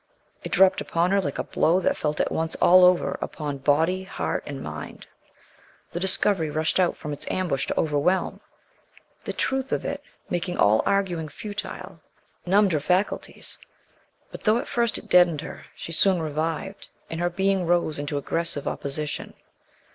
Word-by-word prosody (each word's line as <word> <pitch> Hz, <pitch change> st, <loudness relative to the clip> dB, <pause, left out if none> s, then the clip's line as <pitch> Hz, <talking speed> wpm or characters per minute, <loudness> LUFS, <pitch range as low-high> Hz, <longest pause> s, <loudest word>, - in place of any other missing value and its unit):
It -, -, -6 dB
dropped 190 Hz, -1 st, +5 dB
upon 170 Hz, +2 st, 0 dB
her 200 Hz, 0 st, +3 dB
like 140 Hz, -6 st, -3 dB
a -, -, -1 dB
blow 170 Hz, +3 st, +2 dB
that 280 Hz, +8 st, +1 dB
she -, -, -12 dB
felt 150 Hz, -1 st, -1 dB
at -, -, +1 dB
once 160 Hz, 0 st, -1 dB
all 185 Hz, +1 st, +6 dB
over, 180 Hz, 0 st, +3 dB
upon 145 Hz, -3 st, -4 dB
body, 160 Hz, +7 st, +2 dB
heart 190 Hz, -, -3 dB
and 140 Hz, -2 st, -5 dB
mind. -, -, -8 dB, 0.9 s
The 175 Hz, -, -3 dB
discovery 190 Hz, -2 st, +3 dB
rushed 155 Hz, +4 st, 0 dB
out 180 Hz, -2 st, +2 dB
from 150 Hz, -2 st, -5 dB
its 145 Hz, -, -4 dB
ambush 170 Hz, -8 st, -1 dB
to -, -, -1 dB
overwhelm. 155 Hz, +5 st, +1 dB, 0.9 s
The -, -, -3 dB
truth 265 Hz, 0 st, -1 dB
of -, -, -1 dB
it, -, -, -3 dB, 0.3 s
making 175 Hz, 0 st, -2 dB
all 105 Hz, +2 st, +4 dB
arguing 180 Hz, -6 st, 0 dB
futile, 190 Hz, -1 st, -7 dB, 0.5 s
numbed 200 Hz, +1 st, +4 dB
her 155 Hz, -, +1 dB
faculties. 180 Hz, +7 st, -2 dB, 0.7 s
But -, -, -9 dB
though 215 Hz, +1 st, +4 dB
at -, -, -4 dB
first 235 Hz, -2 st, 0 dB
it -, -, -10 dB
deadened 175 Hz, -4 st, +5 dB
her, -, -, -9 dB
she -, -, -7 dB
soon 185 Hz, +2 st, +3 dB
revived, 160 Hz, +5 st, -3 dB, 0.2 s
and 165 Hz, -, -5 dB
her 175 Hz, 0 st, +1 dB
being 190 Hz, 0 st, 0 dB
rose 170 Hz, -3 st, +1 dB
into 145 Hz, 0 st, -3 dB
aggressive 155 Hz, 0 st, -2 dB
opposition. 145 Hz, +1 st, -3 dB
175 Hz, 170 wpm, -25 LUFS, 155-190 Hz, 0.9 s, all